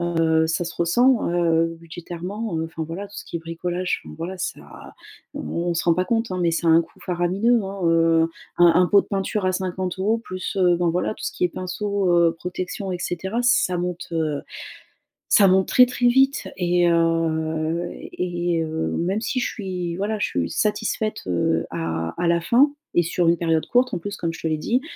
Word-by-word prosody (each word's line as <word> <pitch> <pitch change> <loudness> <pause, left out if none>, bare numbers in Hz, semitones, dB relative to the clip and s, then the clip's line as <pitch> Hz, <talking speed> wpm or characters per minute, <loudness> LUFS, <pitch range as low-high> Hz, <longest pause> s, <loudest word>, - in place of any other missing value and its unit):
heu, 165 -2 +2
ça 165 +2 -1
se 170 - -6
ressent, 240 +8 +3
heu, 165 -1 +1
budgétairement, 175 +4 -6
heu, 160 - -1
enfin 160 0 -5
voilà 185 +5 -6
tout 205 - -13
ce - - -7
qui 170 - -5
est - - -5
bricolage, 175 +2 -3
enfin, - - -9
voilà 185 +3 -5
ça 180 - -4 0.7
o - - -5
on 170 0 -2
se 165 - -1
rend 170 -1 +4
pas 185 +1 0
compte, 225 -1 0
hein, 185 - -2
mais 170 - +3
ça 170 +1 -1
a - - +6
un 165 +1 +6
coût 165 - -19
faramineux, 190 +7 +1
hein, 195 0 -6
heu, 165 0 +4 0.4
un 175 - +7
un 180 +1 +5
pot 200 +1 +5
de - - -20
peinture 195 0 -1
à 185 - +2
50 185 +3 -1
plus, 185 -4 -6
heu, 175 -1 +4
bon, 175 -1 +1
voilà 180 +5 -1
tout - - -9
ce - - -2
qui - - -1
est - - +3
pinceau, 190 +2 -2
heu, 170 -1 +4
protection 185 +3 -4
et 180 - -3
cetera, 190 +6 -2
ça 185 -7 +2
monte, 180 0 -3
heu, 155 -3 -1 0.9
ça 200 -3 +6
monte 190 0 +3
très, 250 - +7
très 245 0 0
vite. 270 +2 +3
Et 175 -1 +2
heu 165 0 0
et 175 -2 -2
heu, 160 0 -2
même 190 +6 -1
si 255 - -1
je - - 0
suis 180 -5 -4
voilà, 210 +2 -1
je - - +1
suis 85 -1 -2
satisfaite, 215 0 -1
heu, 80 -2 +1
à 80 0 -3
à 175 - +1
la 170 0 +2
fin 270 - +4 0.2
et 175 - +4
sur 170 0 +1
une 170 - +3
période 165 -2 +1
courte 250 0 +2
en - - -1
plus 205 +3 -6
comme 165 -1 -2
je - - -10
te 160 - -1
l'ai 155 -1 0
dit. 240 +12 0
175 Hz, 215 wpm, -23 LUFS, 165-195 Hz, 0.9 s, un